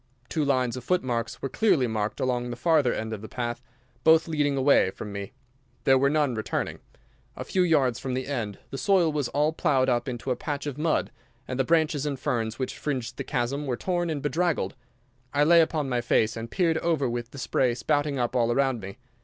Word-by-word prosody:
Two 155 - 0
lines 130 -4 +1
of 125 - -7
footmarks 125 -8 -1
were - - 0
clearly 160 - +2
marked 110 -2 -2
along 125 -1 -1
the 120 - -4
farther 145 -1 +3
end 110 0 -3
of 105 - -6
the 110 - -9
path, 120 -1 -3 0.4
both 160 +1 +5
leading 145 -3 0
away 135 -7 +4
from 105 +2 -8
me. 100 -1 -6 0.5
There 135 - +5
were 140 +1 +3
none 150 -3 +1
returning. 110 -1 -3 0.6
A - - -5
few 185 - 0
yards 140 -9 +2
from 130 -2 -3
the 130 0 -2
end 115 -8 -3
the 135 - -4
soil 185 -5 +3
was 145 -4 -1
all 150 +4 +1
ploughed 135 -6 +2
up 120 0 +1
into 125 +1 -4
a - - +1
patch 145 0 -4
of 145 -3 -3
mud, 160 0 0 0.4
and 130 0 -4
the - - +4
branches 155 -1 +1
and 140 -3 -3
ferns 110 -2 -1
which 130 - -4
fringed 130 -6 -3
the - - -3
chasm 140 +3 -2
were 125 -2 -1
torn 175 -2 -1
and 150 -3 -3
bedraggled. 165 +2 0 0.6
I 145 - +4
lay 170 +2 +7
upon 155 -3 0
my 125 -2 0
face 115 -1 +2
and 115 0 -6
peered 165 -1 +1
over 160 -6 +1
with 120 0 -3
the 140 - -12
spray 120 0 +1
spouting 145 +2 0
up 120 0 -1
all 120 -1 +2
around 130 -1 +1
me. 95 +2 -8
135 Hz, 215 wpm, -26 LUFS, 120-150 Hz, 0.6 s, lay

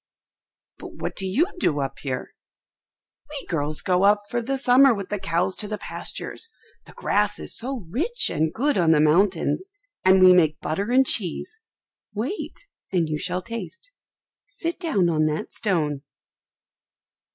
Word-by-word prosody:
"But - - -10
what - - -5
do 190 - -2
you 255 - +2
do 150 - +1
up 135 -1 -4
here?" 130 -3 -5 1.0
"We 295 -2 -7
girls 155 -2 -2
go 180 -1 +2
up 205 +1 +4
for 240 - 0
the 270 +4 -2
summer 260 -1 +5
with 200 -2 -6
the 205 - -2
cows 180 +2 0
to 210 - 0
the 210 0 -4
pastures, 455 - -4 0.4
the - - -13
grass 210 0 0
is - - -3
so 250 -4 -2
rich 345 - +1
and 155 0 0
good 280 - 0
on 170 -2 +3
the 150 - +3
mountains, 180 - +2 0.3
and 190 0 +6
we 185 0 +9
make 160 -4 +3
butter 195 +8 -2
and 260 +2 +4
cheese. 220 - -2 0.6
Wait, 265 - -5 0.3
and 170 -4 +1
you 150 -1 -2
shall 180 +3 -2
taste. 350 - -8 0.6
Sit 335 0 -4
down 290 - +1
on 155 -2 +2
that 155 0 -3
stone." 155 -9 -1
195 Hz, 160 wpm, -24 LUFS, 165-255 Hz, 1.0 s, we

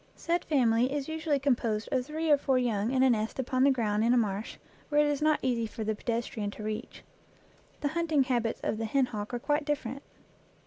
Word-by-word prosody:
Said 340 +1 -1
family 245 -4 +2
is 285 -1 -2
usually 315 -2 0
composed 240 -6 0
of 255 -1 +1
three 310 +3 -2
or 290 - +7
four 270 -2 +1
young 225 -4 0
in 260 0 +2
a 265 - +5
nest 220 -1 -1
upon 255 0 0
the 280 - +6
ground 220 -5 +1
in 240 +2 +4
a - - +4
marsh, 210 -2 -1 0.3
where 295 -1 +3
it 295 - +5
is 290 -1 0
not 310 0 +3
easy 235 -3 0
for 220 +1 -6
the 220 0 0
pedestrian 230 -1 -3
to 210 - -9
reach. 215 0 -5 0.8
The 290 - 0
hunting 315 -3 +1
habits 240 -3 -1
of 215 - -1
the 225 - -1
hen 265 +4 +2
hawk 210 -2 -6
are 245 - -2
quite 295 +5 0
different. 275 -3 -3
255 Hz, 220 wpm, -29 LUFS, 225-290 Hz, 0.8 s, or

